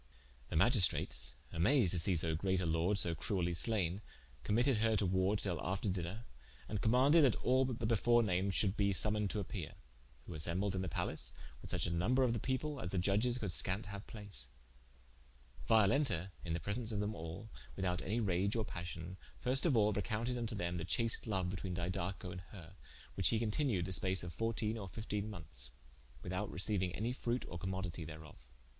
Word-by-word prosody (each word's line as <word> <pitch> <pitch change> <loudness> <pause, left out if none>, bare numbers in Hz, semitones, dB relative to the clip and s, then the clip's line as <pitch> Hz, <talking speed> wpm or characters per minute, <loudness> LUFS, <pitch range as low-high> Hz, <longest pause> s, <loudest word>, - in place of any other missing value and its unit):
The - - -4
Magistrates 95 +2 +4 0.2
amased 95 - +3
to 90 - +4
see 90 +3 +4
so 80 0 +1
great 95 +3 0
a 90 - -1
Lorde 85 +5 +1
so 85 -4 +5
cruelly 90 0 -1
slayne, 95 0 +1 0.4
committed 120 - +2
her 110 +1 +2
to 100 -1 +1
warde 95 +3 +1
til 90 -6 -1
after 95 +3 -1
dinner, 90 +5 -4 0.4
and 105 -1 -3
commaunded 135 +8 +5
that 130 -5 +4
all 130 +1 +2
the 120 -3 -3
before 120 +1 +3
named 95 -1 0
should 100 -1 +4
bee 100 -2 +2
summoned 105 +1 +2
to 105 - -1
appeare: 90 -5 -6 0.5
who 90 - -8
assembled 90 +5 -2
in 95 - -1
the 95 - -3
palace, 60 -5 -3 0.3
with - - -10
such - - -1
a 85 - -2
number 110 +11 +2
of 120 -2 +2
the 115 - -1
people, 135 +4 -2
as 90 - -4
the 95 - -3
iudges 105 +7 +2
could 105 -6 -1
skant 95 +5 0
haue 100 - -5
place: 100 - -2 1.2
Violenta 105 - +3
in 85 - -3
the 85 - -1
presence 110 +7 -2
of 105 - -1
them 105 +1 -1
all, 85 +6 -7 0.2
without 90 -3 -1
any 105 +8 -1
rage 100 0 +1
or 110 -2 0
passion, 85 0 -6 0.2
first 135 +6 +4
of 135 -7 +3
all 105 -1 +4
recompted 115 +5 -2
vnto 115 -3 -3
them 85 -1 -2
the 80 - -3
chast 115 +6 0
loue 95 -4 0
betwene 90 0 -4
Didaco 90 +1 -3
and 90 0 -7
her, 90 -3 -11 0.4
whiche 95 -3 +4
hee 115 - +2
continued 110 - +1
the 95 - -4
space 95 -1 +2
of 85 -1 -6
fourtene 115 -1 -1
or 95 - -7
fiftene 105 +1 -4
monethes, 75 - -4 0.5
without 95 +3 -3
receiuing 95 -1 0
any 115 +4 -2
fruicte 120 0 -2
or 85 - -7
commoditie 90 -4 -4
thereof. 75 -6 -12
100 Hz, 190 wpm, -36 LUFS, 90-110 Hz, 1.2 s, so